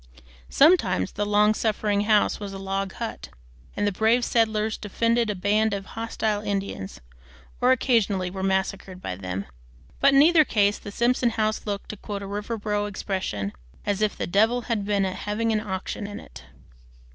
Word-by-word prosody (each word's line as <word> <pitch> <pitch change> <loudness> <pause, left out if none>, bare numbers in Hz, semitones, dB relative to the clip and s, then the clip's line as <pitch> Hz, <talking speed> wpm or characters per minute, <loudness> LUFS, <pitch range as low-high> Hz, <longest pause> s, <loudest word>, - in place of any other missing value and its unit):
Sometimes 275 - +4
the 205 0 -2
long 210 +1 +4
suffering 210 -2 0
house 210 -1 +3
was 200 -1 -6
a - - -6
log 195 0 -3
hut, - - -6 0.5
and 205 - +1
the 205 - +2
brave 220 +5 +2
settlers 220 -1 +1
defeated 230 +2 0
a 210 - -1
band 205 +3 +1
of 195 -1 -6
hostile 220 -1 -2
Indians, 195 - -4 0.6
or 250 +1 +5
occasionally 210 -8 +2
were 190 0 -5
massacred 190 -1 -1
by 90 - -5
them; 95 +1 -5 0.5
but 275 - +5
in 275 - +8
either 325 0 +6
case 205 -6 +1
the 205 - -8
Simpson 240 +2 +2
house 215 -1 -1
looked, 200 -1 -4
to 210 - -6
quote 200 0 -6
a - - -5
Riverboro 205 0 -2
expression, 185 - -3 0.3
"as 205 0 -1
if 215 -1 +1
the - - -2
devil 220 +7 +2
had 225 -4 -2
been 200 -1 +1
having 210 +4 -1
an 215 - +2
auction 195 0 -4
in 205 - -7
it." - - -13
205 Hz, 170 wpm, -25 LUFS, 195-220 Hz, 0.6 s, in